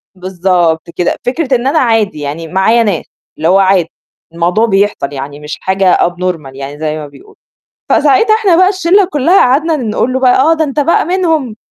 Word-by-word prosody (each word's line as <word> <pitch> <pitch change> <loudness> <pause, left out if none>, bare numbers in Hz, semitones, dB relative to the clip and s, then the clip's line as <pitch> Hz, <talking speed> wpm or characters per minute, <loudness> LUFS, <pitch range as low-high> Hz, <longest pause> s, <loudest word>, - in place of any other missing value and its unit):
بالضبط 180 -3 -1
كده، 175 - -1
فكرة 265 +1 -1
إن 245 +1 -2
أنا 305 +3 +2
عادي 225 - 0
يعني 150 +3 -5
معايا 195 +7 +2
ناس، 200 -7 -2 0.3
اللي 155 - -1
هو 190 +3 +4
عادي، 190 -3 +2 0.4
الموضوع 175 +7 +1
بيحصل 195 -8 -1
يعني، 140 +1 -7
مش 150 0 -7
حاجة 190 -1 +1
abnormal 175 -5 -4
يعني 140 +2 -8
زي 155 -1 -2
ما 150 -1 -7
بيقولوا، 415 - -18 0.6
فساعتها 300 - +3
إحنا 395 -7 +2
بقى 370 +1 +4
الشلّة 380 0 +2
كلها 300 +6 +2
قعدنا 305 +6 +2
نقول 245 -1 -2
له 260 - -1
بقى: 255 0 +3
"آه، 320 +4 +3
ده 320 -1 0
أنت 295 0 -2
بقى 325 +4 +1
منهم 320 - -1
215 Hz, 185 wpm, -12 LUFS, -, 0.6 s, هو